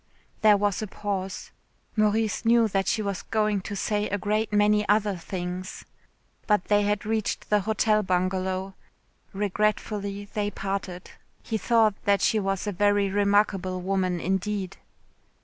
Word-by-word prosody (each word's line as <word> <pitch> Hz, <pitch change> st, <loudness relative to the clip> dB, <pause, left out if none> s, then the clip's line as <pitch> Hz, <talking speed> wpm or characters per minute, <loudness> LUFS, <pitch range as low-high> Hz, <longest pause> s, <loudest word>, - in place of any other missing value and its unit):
There 210 Hz, -1 st, +6 dB
was 205 Hz, 0 st, 0 dB
a 215 Hz, -, -3 dB
pause. 195 Hz, -1 st, -4 dB, 0.4 s
Maurice 215 Hz, 0 st, +1 dB
knew 230 Hz, 0 st, +4 dB
that 195 Hz, -2 st, -1 dB
she 215 Hz, -, +1 dB
was 200 Hz, -2 st, -3 dB
going 215 Hz, -2 st, 0 dB
to 205 Hz, +2 st, -6 dB
say 210 Hz, +1 st, -1 dB
a 205 Hz, -, -1 dB
great 215 Hz, +2 st, -1 dB
many 210 Hz, 0 st, +3 dB
other 205 Hz, -1 st, +2 dB
things. 180 Hz, +1 st, -6 dB, 0.6 s
But 210 Hz, -4 st, +2 dB
they 205 Hz, 0 st, +4 dB
had 205 Hz, 0 st, 0 dB
reached 220 Hz, -1 st, -2 dB
the 210 Hz, -, +5 dB
Hotel 215 Hz, +1 st, +2 dB
Bungalow. 185 Hz, 0 st, -1 dB, 0.6 s
Regretfully 205 Hz, 0 st, -1 dB
they 205 Hz, -1 st, -1 dB
parted. 195 Hz, -2 st, -5 dB, 0.3 s
He 220 Hz, -, -2 dB
thought 225 Hz, 0 st, +3 dB
that 200 Hz, -1 st, +3 dB
she 220 Hz, -, +3 dB
was 195 Hz, -1 st, -2 dB
a 205 Hz, -, -1 dB
very 205 Hz, +1 st, +2 dB
remarkable 200 Hz, -2 st, +1 dB
woman 185 Hz, -1 st, -1 dB
indeed. 190 Hz, +1 st, -2 dB
205 Hz, 145 wpm, -26 LUFS, 190-210 Hz, 0.6 s, There